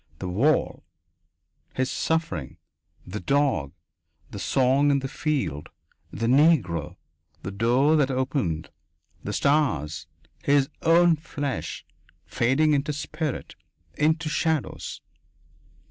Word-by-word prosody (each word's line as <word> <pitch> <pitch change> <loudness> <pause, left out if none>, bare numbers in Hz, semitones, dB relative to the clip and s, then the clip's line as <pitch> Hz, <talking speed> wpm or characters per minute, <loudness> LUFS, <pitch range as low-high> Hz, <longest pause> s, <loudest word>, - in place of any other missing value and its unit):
The 90 - -5
"wall." 120 +13 +1 0.9
His 130 0 0
suffering. 130 - -2 0.5
The 100 +4 -5
dog. 140 - +1 0.6
The 100 - -7
song 135 +5 +2
in 140 - +3
the 135 -1 -3
field. 130 - -2 0.4
The 115 - -3
Negro. 120 - +3 0.5
The 95 - -4
door 125 +9 +3
that 140 -3 +2
opened. 130 - -2 0.5
The - - -4
stars. 140 - 0 0.4
His 140 -1 +3
own 170 0 +5
flesh, 145 -3 -5 0.4
fading 140 +6 +2
into 145 +1 0
spirit, 155 0 -4 0.4
into 155 +2 +1
shadows.... 155 0 -2
140 Hz, 100 wpm, -25 LUFS, 105-155 Hz, 0.9 s, own